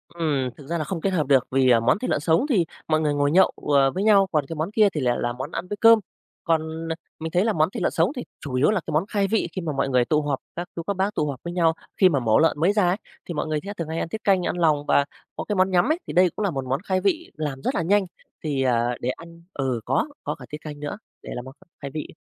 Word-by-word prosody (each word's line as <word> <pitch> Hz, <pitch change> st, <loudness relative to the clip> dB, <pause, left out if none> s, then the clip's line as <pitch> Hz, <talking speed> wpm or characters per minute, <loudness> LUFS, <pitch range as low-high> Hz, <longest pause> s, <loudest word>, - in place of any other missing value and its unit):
Ừm, 145 Hz, -6 st, 0 dB
thực 140 Hz, -, -13 dB
ra 170 Hz, -, -1 dB
là 155 Hz, -, -1 dB
không 165 Hz, +1 st, -4 dB
kết 195 Hz, -, +1 dB
hợp 165 Hz, -7 st, 0 dB
được 135 Hz, -3 st, +4 dB
vì, 130 Hz, 0 st, +3 dB
à, 120 Hz, -2 st, +6 dB
món 115 Hz, -, +2 dB
thịt 255 Hz, -, -3 dB
lợn -, -, +1 dB
sống 160 Hz, -, +2 dB
thì 195 Hz, -11 st, +3 dB, 0.2 s
mọi 155 Hz, 0 st, +2 dB
người 150 Hz, -2 st, +1 dB
ngồi 145 Hz, 0 st, +1 dB
nhậu, 185 Hz, +4 st, +5 dB, 0.2 s
ờ, 135 Hz, -1 st, +5 dB
với 190 Hz, +6 st, -2 dB
nhau, 200 Hz, -2 st, +5 dB
còn 150 Hz, -4 st, +1 dB
cái 165 Hz, -, -5 dB
món 155 Hz, +5 st, -2 dB
kia 215 Hz, -1 st, +4 dB
thì 150 Hz, -, -2 dB
lại 120 Hz, -1 st, +2 dB
là 120 Hz, 0 st, -1 dB
món 130 Hz, +5 st, -6 dB
ăn 180 Hz, -, -4 dB
với 205 Hz, -, -4 dB
cơm. 230 Hz, +1 st, +7 dB, 0.4 s
Còn, 160 Hz, -1 st, -1 dB
à, -, -, -1 dB, 0.2 s
mình 160 Hz, 0 st, -4 dB
thấy 180 Hz, +4 st, +2 dB
là 225 Hz, -, +2 dB
món 155 Hz, -1 st, +2 dB
thịt -, -, -5 dB
lợn -, -, +2 dB
sống 165 Hz, +6 st, +2 dB
thì 250 Hz, -, -4 dB, 0.2 s
chủ 140 Hz, -, -6 dB
yếu 130 Hz, +3 st, +3 dB
là 210 Hz, -4 st, 0 dB
cái -, -, -3 dB
món 155 Hz, +5 st, +2 dB
khai 200 Hz, -2 st, 0 dB
vị 220 Hz, -2 st, +1 dB
khi 185 Hz, -, -4 dB
mà 165 Hz, -3 st, -2 dB
mọi 135 Hz, 0 st, 0 dB
người 125 Hz, -2 st, +3 dB
tụ 155 Hz, +2 st, +2 dB
họp, 145 Hz, -2 st, -2 dB, 0.2 s
các 175 Hz, +1 st, -4 dB
chú 170 Hz, -, -4 dB
các 200 Hz, -, 0 dB
bác 195 Hz, +2 st, 0 dB
tụ 150 Hz, -, 0 dB
họp 135 Hz, -3 st, -5 dB
với 170 Hz, -, -5 dB
nhau, 165 Hz, -2 st, +3 dB, 0.2 s
khi 185 Hz, -, +6 dB
mà 145 Hz, -5 st, +1 dB
mổ 110 Hz, -3 st, +3 dB
lợn 160 Hz, -2 st, +2 dB
mới 175 Hz, +6 st, +3 dB
ra 205 Hz, -4 st, +3 dB
ấy, 180 Hz, -, +1 dB, 0.3 s
thì 175 Hz, -, -5 dB
mọi 155 Hz, -, -2 dB
người 155 Hz, -1 st, 0 dB, 0.2 s
thường 165 Hz, -2 st, -3 dB
hay 160 Hz, +1 st, -2 dB
ăn -, -, -3 dB
tiết 215 Hz, +4 st, -6 dB
canh, 190 Hz, -3 st, +3 dB
ăn -, -, -2 dB
lòng 155 Hz, -4 st, +2 dB
và 140 Hz, -, +3 dB, 0.3 s
có -, -, -4 dB
cái 210 Hz, -, -2 dB
món 190 Hz, 0 st, +2 dB
nhắm 185 Hz, +10 st, +3 dB
ấy. 325 Hz, -, 0 dB
Thì -, -, -5 dB
đây 180 Hz, 0 st, +5 dB
cũng 215 Hz, -, -1 dB
là 195 Hz, -, +1 dB
một 135 Hz, -4 st, -4 dB
món 130 Hz, +2 st, -1 dB
khai 185 Hz, -2 st, 0 dB
vị 320 Hz, -, 0 dB
làm 145 Hz, -4 st, -4 dB
rất -, -, -1 dB
là -, -, +1 dB
nhanh 195 Hz, +4 st, +2 dB, 0.4 s
thì, 145 Hz, -4 st, -1 dB
ờ, 120 Hz, -1 st, +1 dB
để 125 Hz, -, -1 dB
ăn 170 Hz, +5 st, -8 dB
ừ, 130 Hz, -4 st, -2 dB
có, -, -, +1 dB, 0.2 s
có -, -, -3 dB
cả -, -, -12 dB
tiết 150 Hz, -, -5 dB
canh 150 Hz, -2 st, -8 dB
nữa 150 Hz, +7 st, -5 dB, 0.3 s
để -, -, -8 dB
làm 125 Hz, -, -6 dB
món 130 Hz, -, -10 dB, 0.3 s
khai 140 Hz, -1 st, -6 dB
vị 155 Hz, -, -3 dB
ấy. -, -, -15 dB
160 Hz, 310 wpm, -24 LUFS, 140-185 Hz, 0.4 s, cơm